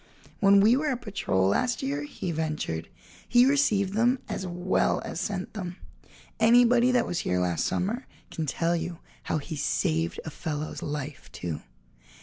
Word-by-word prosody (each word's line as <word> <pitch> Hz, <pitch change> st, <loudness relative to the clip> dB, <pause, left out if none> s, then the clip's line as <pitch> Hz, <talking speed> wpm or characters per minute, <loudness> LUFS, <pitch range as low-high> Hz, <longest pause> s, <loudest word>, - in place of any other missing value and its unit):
"When 200 Hz, 0 st, +6 dB
we 220 Hz, +4 st, +6 dB
were 295 Hz, +3 st, 0 dB
a 260 Hz, -, 0 dB
patrol 190 Hz, -, 0 dB
last 245 Hz, -, 0 dB
year," 140 Hz, +2 st, -1 dB
he 170 Hz, +4 st, -4 dB
ventured, 155 Hz, -, -3 dB, 0.4 s
"he 245 Hz, +1 st, +6 dB
received 220 Hz, -9 st, +2 dB
them 240 Hz, +4 st, +3 dB
as 190 Hz, -, -4 dB
well 180 Hz, +1 st, +1 dB
as -, -, -4 dB
sent 190 Hz, -1 st, -3 dB
them. 180 Hz, -4 st, -5 dB, 0.6 s
Anybody 240 Hz, +2 st, +5 dB
that 250 Hz, -, +3 dB
was 175 Hz, -, -2 dB
here 90 Hz, -, 0 dB
last 90 Hz, -3 st, 0 dB
summer 225 Hz, +8 st, -2 dB, 0.2 s
can 160 Hz, -2 st, -3 dB
tell 165 Hz, +4 st, +1 dB
you 170 Hz, 0 st, -3 dB, 0.3 s
how -, -, 0 dB
he 155 Hz, +2 st, -5 dB
saved 165 Hz, +3 st, 0 dB
a 160 Hz, -, -5 dB
fellow's 155 Hz, -1 st, -4 dB
life, 145 Hz, -2 st, -5 dB
too." 80 Hz, -4 st, -5 dB
175 Hz, 160 wpm, -27 LUFS, 150-230 Hz, 0.6 s, When